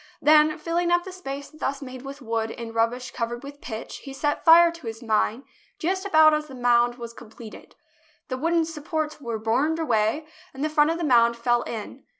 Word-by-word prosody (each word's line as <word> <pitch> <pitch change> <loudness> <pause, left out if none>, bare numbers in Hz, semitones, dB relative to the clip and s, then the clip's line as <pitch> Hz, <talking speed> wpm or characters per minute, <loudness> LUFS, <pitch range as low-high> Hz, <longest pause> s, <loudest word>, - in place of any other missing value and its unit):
Then 305 0 +5
filling 340 +2 -1
up 350 0 +3
the 375 - -8
space 280 -6 -7
thus 280 -3 -3
made 255 -2 -9
with 275 +1 -9
wood 225 -1 -2
and 225 0 -7
rubbish 230 +2 -1
cov 230 -2 -3
ered 240 +2 -7
with 285 +1 -10
pitch, 220 -2 -7
he 275 - -10
set 290 +2 -2
fire 335 +1 +7
to 335 -7 -11
his 225 +1 -7
mine 225 +2 0 0.3
just 375 +4 -2
about 315 -4 +6
as 305 0 -1
the 265 - -10
mound 240 -1 +3
was 235 -1 -8
completed. 225 -2 -13 0.5
The 255 -3 -3
wooden 330 +2 +1
supports 310 -1 -4
were 235 -4 -3
burned 250 +9 0
away, 240 -1 0 0.3
and 270 - -4
the 310 - +1
front 300 0 +3
of 330 - -1
the 340 - -4
mound 235 -4 +4
fell 240 0 +1
in. 235 +4 -7
275 Hz, 205 wpm, -24 LUFS, 235-310 Hz, 0.5 s, fire